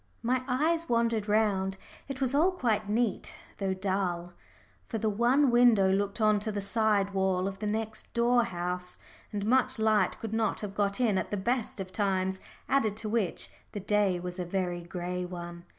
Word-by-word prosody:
My 250 Hz, +2 st, +1 dB
eyes 320 Hz, +6 st, +1 dB
wandered 230 Hz, -2 st, +1 dB
round. 195 Hz, -3 st, +1 dB, 0.3 s
It 270 Hz, -1 st, -5 dB
was 265 Hz, -1 st, +1 dB
all 335 Hz, +6 st, +3 dB
quite 220 Hz, -, 0 dB
neat, 225 Hz, -1 st, 0 dB, 0.2 s
though 190 Hz, -1 st, 0 dB
dull. 185 Hz, -2 st, -2 dB, 0.5 s
For 225 Hz, -, -3 dB
the 220 Hz, 0 st, 0 dB
one 245 Hz, +6 st, +3 dB
window 235 Hz, -6 st, +5 dB
looked 200 Hz, +2 st, -1 dB
on 215 Hz, -1 st, +4 dB
to 215 Hz, +1 st, -2 dB
the 205 Hz, -, -3 dB
side 205 Hz, -1 st, +1 dB
wall 190 Hz, -1 st, +1 dB
of 195 Hz, -1 st, -5 dB
the 210 Hz, -, -2 dB
next 220 Hz, +1 st, -3 dB
door 240 Hz, 0 st, +3 dB
house, 180 Hz, 0 st, -4 dB, 0.3 s
and 205 Hz, -1 st, -3 dB
much 255 Hz, +2 st, +3 dB
light 215 Hz, -4 st, +2 dB
could 225 Hz, -1 st, -5 dB
not 220 Hz, -2 st, 0 dB
have 205 Hz, -2 st, -5 dB
got 200 Hz, 0 st, 0 dB
in 215 Hz, -6 st, +2 dB
at -, -, -4 dB
the 205 Hz, -, -2 dB
best 235 Hz, +2 st, -1 dB
of 190 Hz, -1 st, -5 dB
times, 190 Hz, -1 st, 0 dB, 0.3 s
added 225 Hz, -7 st, +1 dB
to 220 Hz, -1 st, -1 dB
which, 210 Hz, -5 st, -1 dB, 0.2 s
the 205 Hz, -, -3 dB
day 200 Hz, -2 st, +1 dB
was 180 Hz, +1 st, -6 dB
a -, -, 0 dB
very 175 Hz, -1 st, -2 dB
gray 180 Hz, +1 st, -4 dB
one. 175 Hz, -1 st, -7 dB
205 Hz, 185 wpm, -29 LUFS, 190-230 Hz, 0.5 s, window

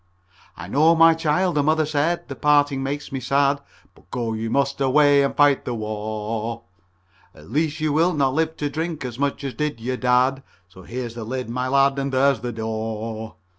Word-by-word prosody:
"I -, -, -8 dB
know, 160 Hz, +4 st, +4 dB
my 165 Hz, 0 st, +7 dB
child," 165 Hz, +3 st, 0 dB
the 150 Hz, -, +2 dB
mother 155 Hz, +2 st, +2 dB
said. 155 Hz, +3 st, -1 dB
"The -, -, -6 dB
parting 145 Hz, -2 st, +2 dB
makes 140 Hz, +2 st, -4 dB
me 135 Hz, -, -3 dB
sad, 140 Hz, +2 st, +1 dB, 0.3 s
But -, -, -24 dB
go 115 Hz, -2 st, -3 dB
you 110 Hz, +1 st, -3 dB
must 140 Hz, +2 st, 0 dB
away 140 Hz, +1 st, +4 dB
and 140 Hz, -, 0 dB
fight 145 Hz, -2 st, +4 dB
the 120 Hz, -, -3 dB
war. 110 Hz, +1 st, -4 dB, 0.7 s
At 75 Hz, -, -15 dB
least 155 Hz, +1 st, 0 dB
you 155 Hz, -1 st, 0 dB
will 170 Hz, +3 st, +2 dB
not 135 Hz, -3 st, +1 dB
live 160 Hz, +2 st, -1 dB
to 145 Hz, -, -2 dB
drink 160 Hz, -2 st, -4 dB
as 120 Hz, 0 st, -6 dB
much 140 Hz, 0 st, -1 dB
as 135 Hz, -2 st, -4 dB
did 150 Hz, -4 st, -3 dB
your 125 Hz, +2 st, -3 dB
dad 125 Hz, +2 st, +2 dB, 0.3 s
So 95 Hz, 0 st, -15 dB
here's 120 Hz, +3 st, -6 dB
your 115 Hz, -2 st, -6 dB
lid, 125 Hz, 0 st, -4 dB
my 125 Hz, +1 st, -2 dB
lad, 140 Hz, +1 st, +3 dB
and 140 Hz, 0 st, -2 dB
there's 135 Hz, -1 st, +3 dB
the 120 Hz, +2 st, -4 dB
door." 110 Hz, 0 st, -5 dB
135 Hz, 200 wpm, -22 LUFS, 115-150 Hz, 0.7 s, my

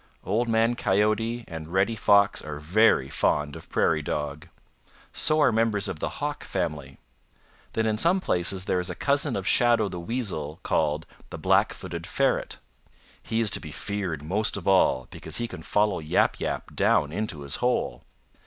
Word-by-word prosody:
"Old 115 Hz, +5 st, 0 dB
Man 115 Hz, +1 st, +2 dB
Coyote 110 Hz, +3 st, 0 dB
and 80 Hz, -1 st, -8 dB
Reddy 95 Hz, +5 st, +1 dB
Fox 100 Hz, -1 st, +4 dB
are 75 Hz, -1 st, -6 dB
very 80 Hz, -2 st, +3 dB
fond 75 Hz, +1 st, 0 dB
of -, -, -11 dB
Prairie 75 Hz, -, +1 dB
Dog. 75 Hz, 0 st, -4 dB, 0.7 s
So 155 Hz, 0 st, +3 dB
are 150 Hz, -, +5 dB
members 110 Hz, -2 st, +1 dB
of 80 Hz, -, -5 dB
the -, -, -4 dB
Hawk 145 Hz, +1 st, -3 dB
family. 75 Hz, -5 st, -4 dB, 0.8 s
Then 110 Hz, -, 0 dB
in 110 Hz, -1 st, 0 dB
some 180 Hz, +7 st, +3 dB
places 90 Hz, -, +1 dB
there 90 Hz, -, +1 dB
is 90 Hz, +1 st, -3 dB
a 90 Hz, -, -4 dB
cousin 140 Hz, -1 st, +1 dB
of 95 Hz, -, -3 dB
Shadow 120 Hz, -3 st, +4 dB
the 90 Hz, -, -6 dB
Weasel 85 Hz, -, -3 dB
called 80 Hz, 0 st, 0 dB, 0.2 s
the -, -, -7 dB
Black -, -, +3 dB
footed 85 Hz, +1 st, -7 dB
Ferret. 135 Hz, +9 st, 0 dB, 0.6 s
He 115 Hz, 0 st, -1 dB
is 110 Hz, -3 st, +2 dB
to -, -, 0 dB
be 75 Hz, -, -9 dB
feared 95 Hz, -5 st, -4 dB
most 100 Hz, +7 st, 0 dB
of 100 Hz, -, -7 dB
all 90 Hz, -9 st, +3 dB
because -, -, -3 dB
he 120 Hz, -, -2 dB
can 80 Hz, -, -9 dB
follow 105 Hz, +3 st, +1 dB
Yap 75 Hz, -1 st, +1 dB
Yap -, -, -4 dB
down 75 Hz, -, +2 dB
into 95 Hz, -4 st, -4 dB
his 70 Hz, -1 st, -2 dB
hole. 125 Hz, -, -1 dB
95 Hz, 175 wpm, -26 LUFS, 80-115 Hz, 0.8 s, are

